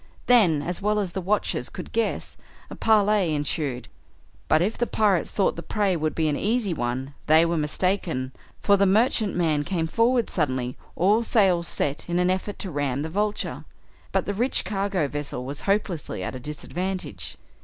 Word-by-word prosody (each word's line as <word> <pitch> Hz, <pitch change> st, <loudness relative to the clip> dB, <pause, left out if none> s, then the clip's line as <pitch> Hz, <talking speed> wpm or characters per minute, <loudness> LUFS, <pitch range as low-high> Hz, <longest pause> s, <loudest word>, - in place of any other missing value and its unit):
Then, 185 Hz, -12 st, +5 dB
as 175 Hz, +2 st, -4 dB
well 210 Hz, +1 st, +1 dB
as 195 Hz, -4 st, -2 dB
the 190 Hz, -, -3 dB
watchers 185 Hz, -9 st, 0 dB
could -, -, -8 dB
guess, 230 Hz, 0 st, -1 dB, 0.4 s
a -, -, -6 dB
parley 210 Hz, -6 st, +3 dB
ensued, 145 Hz, -3 st, -2 dB, 0.6 s
but 155 Hz, -, +4 dB
if 195 Hz, +6 st, 0 dB
the 240 Hz, -, -1 dB
pirates 205 Hz, -5 st, +2 dB
thought 195 Hz, -, +1 dB
the 170 Hz, -, -5 dB
prey 200 Hz, -1 st, 0 dB
would 155 Hz, -2 st, -1 dB
be 160 Hz, -1 st, +1 dB
an 150 Hz, -, +1 dB
easy 215 Hz, +1 st, 0 dB
one 130 Hz, 0 st, -3 dB
they 160 Hz, +2 st, +6 dB
were 170 Hz, 0 st, 0 dB
mistaken, 155 Hz, -3 st, -1 dB, 0.3 s
for 200 Hz, -1 st, +4 dB
the 200 Hz, 0 st, +4 dB
merchantman 185 Hz, -, +2 dB
came 165 Hz, +1 st, -1 dB
forward 230 Hz, +7 st, +2 dB
suddenly, 130 Hz, -6 st, -1 dB, 0.2 s
all 205 Hz, +5 st, +3 dB
sails 190 Hz, -7 st, +2 dB
set, 145 Hz, +3 st, -2 dB
in 175 Hz, -, 0 dB
an 180 Hz, +1 st, +3 dB
effort 190 Hz, +2 st, -3 dB
to 190 Hz, -, -5 dB
ram 145 Hz, -2 st, -1 dB
the 160 Hz, -, -4 dB
Vulture. 210 Hz, +4 st, -2 dB, 0.5 s
But -, -, +1 dB
the 200 Hz, -, -2 dB
rich 240 Hz, +6 st, 0 dB
cargo 195 Hz, -4 st, 0 dB
vessel 140 Hz, -3 st, -4 dB
was 140 Hz, +2 st, -6 dB
hopelessly 180 Hz, -, -1 dB
at -, -, -4 dB
a 130 Hz, -, -6 dB
disadvantage. 150 Hz, -, -5 dB
180 Hz, 175 wpm, -25 LUFS, 150-205 Hz, 0.6 s, they